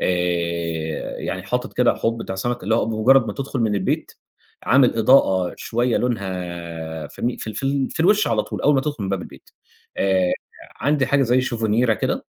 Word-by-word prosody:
آآ، 85 Hz, -3 st, -1 dB
يعني 95 Hz, -, -4 dB
حاطط 125 Hz, +7 st, -3 dB
كده 125 Hz, -1 st, +3 dB
حوض 115 Hz, 0 st, -1 dB
بتاع 95 Hz, -, -5 dB
سَمَك، 120 Hz, +6 st, -3 dB
اللي 110 Hz, +4 st, +1 dB
هو -, -, +1 dB
بمُجرّد 115 Hz, +3 st, +4 dB
ما -, -, -3 dB
تدخل 135 Hz, -2 st, -4 dB
من 110 Hz, -2 st, +1 dB
البيت، 95 Hz, -2 st, -1 dB, 0.5 s
عامل 130 Hz, -3 st, +4 dB
إضاءة 95 Hz, -7 st, +4 dB
شويّة 120 Hz, +1 st, 0 dB
لونها 85 Hz, -8 st, -4 dB
فاهمني، 120 Hz, -, -3 dB
في -, -, -7 dB
ال 110 Hz, -, -5 dB
في -, -, -5 dB
ال 135 Hz, 0 st, 0 dB
في -, -, -4 dB
الوش 205 Hz, +5 st, +4 dB
على 110 Hz, -2 st, +1 dB
طول، -, -, -6 dB
أوّل 150 Hz, -, +4 dB
ما 135 Hz, -, +3 dB
تدخل 145 Hz, -5 st, -4 dB
من -, -, -3 dB
باب 95 Hz, -2 st, -1 dB
البيت، -, -, -14 dB, 0.5 s
آآ، 95 Hz, -2 st, +2 dB, 0.4 s
عندي 140 Hz, 0 st, +1 dB
حاجة 140 Hz, 0 st, +3 dB
زي 125 Hz, 0 st, +3 dB
شوفنيرا 115 Hz, -1 st, +1 dB
كده، -, -, -2 dB
110 Hz, 190 wpm, -22 LUFS, 90-125 Hz, 0.5 s, بمُجرّد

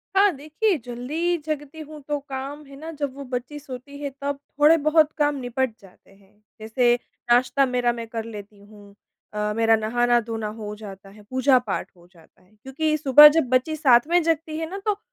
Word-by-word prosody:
हाँ, 400 Hz, +1 st, +5 dB
देखिए, 310 Hz, +8 st, -1 dB
जल्दी 295 Hz, +9 st, -2 dB
जगती 300 Hz, 0 st, -5 dB
हूँ 305 Hz, -1 st, -10 dB
तो 295 Hz, -1 st, -1 dB
काम, 280 Hz, +1 st, -7 dB
है 275 Hz, 0 st, -13 dB
ना 315 Hz, +4 st, -8 dB
जब 285 Hz, -4 st, -4 dB
वो 280 Hz, -, -8 dB
बच्ची 255 Hz, +3 st, -5 dB
सोती 275 Hz, 0 st, -10 dB
है 285 Hz, -, -2 dB
तब 280 Hz, 0 st, -3 dB, 0.2 s
थोड़े-बहुत 305 Hz, 0 st, +4 dB
काम 295 Hz, -1 st, +1 dB
निपट 250 Hz, -1 st, -2 dB
जाते 195 Hz, 0 st, -20 dB
हैं। 200 Hz, +1 st, -25 dB, 0.2 s
जैसे 240 Hz, +2 st, +2 dB, 0.4 s
नाश्ता 255 Hz, +3 st, +3 dB
मेरा 250 Hz, -1 st, 0 dB
मैं 230 Hz, -1 st, -7 dB
कर 225 Hz, 0 st, -5 dB
लेती 210 Hz, -2 st, -10 dB
हूँ, 205 Hz, 0 st, -17 dB, 0.4 s
अ, 210 Hz, 0 st, -2 dB
मेरा 225 Hz, 0 st, +4 dB
नहाना-धोना 230 Hz, 0 st, 0 dB
हो 210 Hz, -1 st, -6 dB
जाता 195 Hz, -2 st, -11 dB
है, 210 Hz, +1 st, -16 dB
पूजा-पाठ 260 Hz, -1 st, +1 dB
हो 175 Hz, -1 st, -21 dB
जाता 165 Hz, +1 st, -23 dB
है। 185 Hz, +2 st, -28 dB
क्योंकि 305 Hz, +4 st, -1 dB
सुबह 295 Hz, +1 st, +9 dB
जब 270 Hz, -6 st, +1 dB
बच्ची 255 Hz, +5 st, +1 dB
साथ 265 Hz, -4 st, +4 dB
में 350 Hz, +1 st, +3 dB
जगती 320 Hz, -1 st, -1 dB
है 320 Hz, 0 st, -4 dB
ना 385 Hz, -, -6 dB
तो 420 Hz, -2 st, 0 dB
260 Hz, 185 wpm, -23 LUFS, 225-300 Hz, 0.4 s, सुबह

